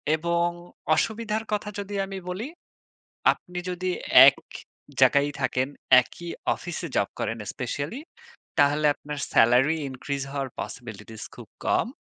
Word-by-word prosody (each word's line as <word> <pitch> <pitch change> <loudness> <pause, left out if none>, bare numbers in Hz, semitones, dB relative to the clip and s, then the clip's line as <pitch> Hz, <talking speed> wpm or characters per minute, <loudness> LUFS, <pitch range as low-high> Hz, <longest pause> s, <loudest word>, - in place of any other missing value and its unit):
এবং 170 +2 +1 0.5
অসুবিধার 220 +3 -1
কথা 210 0 -1
যদি 200 0 -5
আমি 195 0 -7
বলি, 195 +7 -4 0.9
আপনি 180 0 -9
যদি 185 +1 -2 0.4
এক - - +7 0.6
জায়গায় 140 +1 +5
থাকেন, 130 0 0 0.3
একই 170 +6 -9 0.3
অফিসে 175 0 -6
জব 100 - +2
করেন 115 +1 -2
স্পেশালি, 140 - -4 0.6
তাহলে 145 +1 +4
আপনার 150 0 -7 0.2
সেলারি 125 +7 +5
increase 135 +1 -4
হওয়ার 135 -2 -3
পসিবিলিটিস 110 -2 -8
খুব 120 -3 -11 0.2
কম। - - +2
150 Hz, 120 wpm, -26 LUFS, 130-180 Hz, 0.9 s, এক